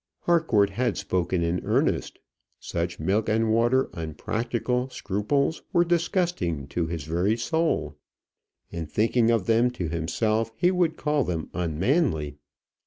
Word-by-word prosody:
Harcourt 140 Hz, -, +3 dB
had 120 Hz, +1 st, -1 dB
spoken 90 Hz, -2 st, -1 dB
in 85 Hz, +2 st, -1 dB
earnest. -, -, 0 dB, 0.4 s
Such 85 Hz, +1 st, -3 dB
milk 100 Hz, +8 st, 0 dB
and 110 Hz, 0 st, +2 dB
water, 120 Hz, +3 st, +3 dB
unpractical 115 Hz, -, -2 dB
scruples 130 Hz, -, -1 dB
were 175 Hz, 0 st, +4 dB
disgusting 170 Hz, -, 0 dB
to 80 Hz, +4 st, -1 dB
his 80 Hz, -3 st, -4 dB
very 90 Hz, +8 st, 0 dB
soul. 155 Hz, -, 0 dB, 0.8 s
In 85 Hz, -2 st, -5 dB
thinking 115 Hz, +6 st, +2 dB
of 115 Hz, -5 st, +2 dB
them 115 Hz, +2 st, +3 dB
to 95 Hz, -10 st, -4 dB
himself, 110 Hz, +7 st, 0 dB
he 180 Hz, +6 st, +3 dB
would 175 Hz, -3 st, +1 dB
call 150 Hz, -2 st, +1 dB
them 85 Hz, -6 st, -4 dB
unmanly. 85 Hz, -, 0 dB
110 Hz, 130 wpm, -26 LUFS, 85-130 Hz, 0.8 s, were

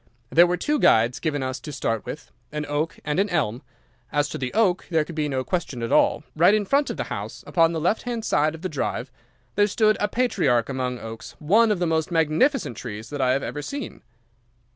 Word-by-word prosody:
There 170 Hz, +2 st, +7 dB
were 180 Hz, +1 st, 0 dB
two 295 Hz, -, 0 dB
guides 115 Hz, +3 st, +4 dB
given 145 Hz, -4 st, -1 dB
us 130 Hz, 0 st, -3 dB
to 150 Hz, -, -8 dB
start 115 Hz, -5 st, -2 dB
with, -, -, -7 dB, 0.2 s
an 150 Hz, 0 st, -3 dB
oak 145 Hz, +3 st, -2 dB
and 150 Hz, +4 st, 0 dB
an 205 Hz, +1 st, +2 dB
elm. 130 Hz, -, -1 dB, 0.5 s
As 145 Hz, 0 st, +1 dB
to -, -, -5 dB
the 130 Hz, -1 st, -3 dB
oak 195 Hz, -5 st, +2 dB
there 160 Hz, -3 st, +2 dB
could 170 Hz, -, -8 dB
be 150 Hz, -2 st, -1 dB
no 130 Hz, -2 st, -1 dB
question 140 Hz, -7 st, -3 dB
at 115 Hz, -, -3 dB
all. -, -, +3 dB
Right 175 Hz, +6 st, +5 dB
in 210 Hz, -1 st, 0 dB
front 280 Hz, +7 st, +2 dB
of -, -, -4 dB
the -, -, -1 dB
house, -, -, -6 dB
upon 165 Hz, -1 st, +3 dB
the 165 Hz, -, -2 dB
left 180 Hz, +7 st, +1 dB
hand 235 Hz, -2 st, -4 dB
side 155 Hz, +2 st, +2 dB
of 160 Hz, -, -12 dB
the -, -, 0 dB
drive, 135 Hz, -5 st, -3 dB, 0.4 s
there 205 Hz, 0 st, +3 dB
stood 215 Hz, +1 st, +2 dB
a 205 Hz, -, +1 dB
patriarch 145 Hz, -, +1 dB
among 130 Hz, -2 st, -2 dB
oaks, 115 Hz, -1 st, -9 dB
one 215 Hz, +9 st, +4 dB
of 210 Hz, -, +1 dB
the 175 Hz, -, 0 dB
most 160 Hz, -1 st, 0 dB
magnificent 165 Hz, -, +1 dB
trees 110 Hz, -1 st, -7 dB
that 145 Hz, -1 st, -3 dB
I 130 Hz, -1 st, +3 dB
have 135 Hz, -, -1 dB
ever 150 Hz, -, -4 dB
seen. 280 Hz, -, -6 dB
155 Hz, 230 wpm, -24 LUFS, 130-190 Hz, 0.5 s, There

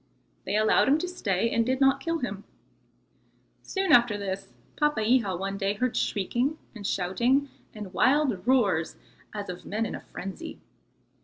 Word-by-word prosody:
They -, -, -1 dB
allowed 215 Hz, 0 st, +4 dB
him 280 Hz, +3 st, +5 dB
to 360 Hz, -, -3 dB
stay, 230 Hz, -, -1 dB
and 230 Hz, -, +2 dB
did 260 Hz, +3 st, 0 dB
not 270 Hz, 0 st, +4 dB
kill 330 Hz, +4 st, -1 dB
him. 205 Hz, -8 st, -5 dB, 1.2 s
Soon 385 Hz, -1 st, -1 dB
after 235 Hz, -3 st, +5 dB
this, 195 Hz, -1 st, -4 dB, 0.3 s
Papeiha 230 Hz, -8 st, +2 dB
one 195 Hz, +2 st, -4 dB
day 200 Hz, 0 st, 0 dB
heard 250 Hz, +3 st, -1 dB
shrieking 240 Hz, -, 0 dB, 0.2 s
and 205 Hz, -4 st, -5 dB
shouting 235 Hz, +10 st, +1 dB, 0.3 s
and 205 Hz, -3 st, -8 dB
wild 260 Hz, -7 st, +2 dB
roars 200 Hz, -11 st, +2 dB, 0.4 s
as 205 Hz, -1 st, -5 dB
of 180 Hz, -1 st, -7 dB
men 220 Hz, +2 st, -2 dB
in -, -, -4 dB
a -, -, -5 dB
frenzy. 190 Hz, 0 st, -8 dB
220 Hz, 155 wpm, -27 LUFS, 195-265 Hz, 1.2 s, him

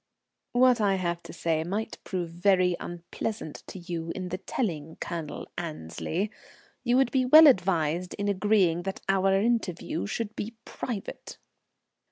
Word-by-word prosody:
"What 245 Hz, -1 st, +5 dB
I 200 Hz, -2 st, +3 dB
have 175 Hz, -2 st, -2 dB
to -, -, -10 dB
say 165 Hz, -2 st, 0 dB
might 205 Hz, +6 st, -3 dB
prove 175 Hz, -3 st, -3 dB
very 180 Hz, 0 st, +3 dB
unpleasant 175 Hz, 0 st, -5 dB
to -, -, -8 dB
you 170 Hz, -2 st, -4 dB
in 185 Hz, -1 st, -4 dB
the 185 Hz, +1 st, -4 dB
telling, 165 Hz, -, -3 dB
Colonel 165 Hz, -3 st, -5 dB
Annesley. 165 Hz, -, -3 dB, 0.5 s
You 245 Hz, 0 st, +3 dB
would 265 Hz, -2 st, +3 dB
be 260 Hz, -1 st, +3 dB
well 310 Hz, +5 st, +10 dB
advised 180 Hz, -, +3 dB
in 205 Hz, -, -2 dB
agreeing 195 Hz, -4 st, +3 dB
that 190 Hz, +1 st, -5 dB
our 195 Hz, 0 st, +3 dB
interview 195 Hz, -, 0 dB
should 220 Hz, -, -3 dB
be 225 Hz, +3 st, -5 dB
private." 225 Hz, -6 st, -6 dB
185 Hz, 145 wpm, -28 LUFS, 170-215 Hz, 0.5 s, well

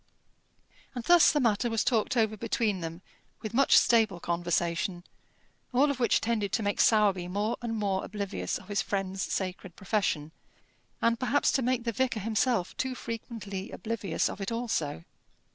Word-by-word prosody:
And 245 Hz, -, -4 dB
thus 345 Hz, +4 st, +6 dB
the 295 Hz, -, +1 dB
matter 235 Hz, -2 st, +1 dB
was 225 Hz, -2 st, 0 dB
talked 240 Hz, +1 st, +1 dB
over 220 Hz, -1 st, +2 dB
between 215 Hz, -2 st, -1 dB
them 165 Hz, +2 st, -6 dB, 0.4 s
with 215 Hz, 0 st, -5 dB
much 270 Hz, +3 st, +5 dB
stable 220 Hz, -6 st, +4 dB
conversation, 175 Hz, +1 st, -1 dB, 0.7 s
all 280 Hz, +4 st, +4 dB
of 270 Hz, -, -5 dB
which 235 Hz, -, +3 dB
tended 215 Hz, -4 st, -1 dB
to 220 Hz, -, +1 dB
make 205 Hz, 0 st, +1 dB
Sowerby 200 Hz, -5 st, +3 dB
more 205 Hz, +5 st, -1 dB
and 235 Hz, -1 st, -3 dB
more 195 Hz, -2 st, 0 dB
oblivious 200 Hz, -1 st, -3 dB
of 185 Hz, -, -15 dB
his 200 Hz, -1 st, +1 dB
friend's 195 Hz, -1 st, -3 dB
sacred 185 Hz, -2 st, -3 dB
profession, 185 Hz, -7 st, -1 dB, 0.7 s
and 230 Hz, 0 st, +2 dB
perhaps 255 Hz, +3 st, +2 dB
to 270 Hz, -, +1 dB
make 250 Hz, -1 st, 0 dB
the 235 Hz, -, -1 dB
vicar 240 Hz, 0 st, 0 dB
himself 220 Hz, -2 st, 0 dB
too 260 Hz, -1 st, -2 dB
frequently 220 Hz, -4 st, -6 dB
oblivious 215 Hz, -7 st, -2 dB
of 200 Hz, -, -6 dB
it 195 Hz, -, -3 dB
also. 220 Hz, -, -2 dB
215 Hz, 160 wpm, -29 LUFS, 190-235 Hz, 0.7 s, thus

